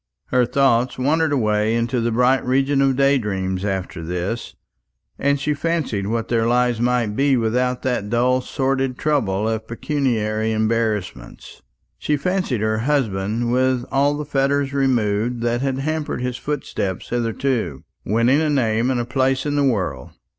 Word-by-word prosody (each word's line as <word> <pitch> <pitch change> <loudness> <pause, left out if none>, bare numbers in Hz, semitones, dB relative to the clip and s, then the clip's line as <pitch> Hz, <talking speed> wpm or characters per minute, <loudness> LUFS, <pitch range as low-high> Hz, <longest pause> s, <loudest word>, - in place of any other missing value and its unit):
Her 125 -1 +2
thoughts 125 -1 +2
wandered 155 +4 +1
away 110 -4 +1
into 120 +1 0
the 115 0 0
bright 125 +3 +3
region 135 +2 +2
of 135 -1 +3
day 140 +1 +3
dreams 95 -3 -2
after 95 -3 -3
this, 90 +7 -4 0.6
and 140 0 +1
she 150 +2 0
fancied 145 -10 -2
what 115 +1 -2
their 115 -1 +1
lives 120 -1 +2
might 120 -3 +1
be 135 0 +3
without 125 +2 0
that 125 -6 -1
dull 125 +3 +2
sordid 135 -1 -1
trouble 110 -9 0
of 110 -1 -2
pecuniary 110 -5 -1
embarrassments. 110 - -2 0.4
She 150 - 0
fancied 180 - -1
her 110 0 0
husband, 115 -4 0
with 130 0 +1
all 145 +2 +2
the 150 - -4
fetters 140 0 0
removed 120 -3 0
that 120 +1 0
had 135 -1 -1
hampered 155 0 -2
his 125 0 -2
footsteps 125 -11 -4
hitherto, 120 - -1 0.2
winning 115 +8 +2
a 155 - +1
name 120 -4 +1
and 130 -2 0
a 120 - -1
place 130 +2 0
in 145 -1 -1
the 145 - +2
world. 90 - -1
125 Hz, 155 wpm, -21 LUFS, 110-135 Hz, 0.6 s, bright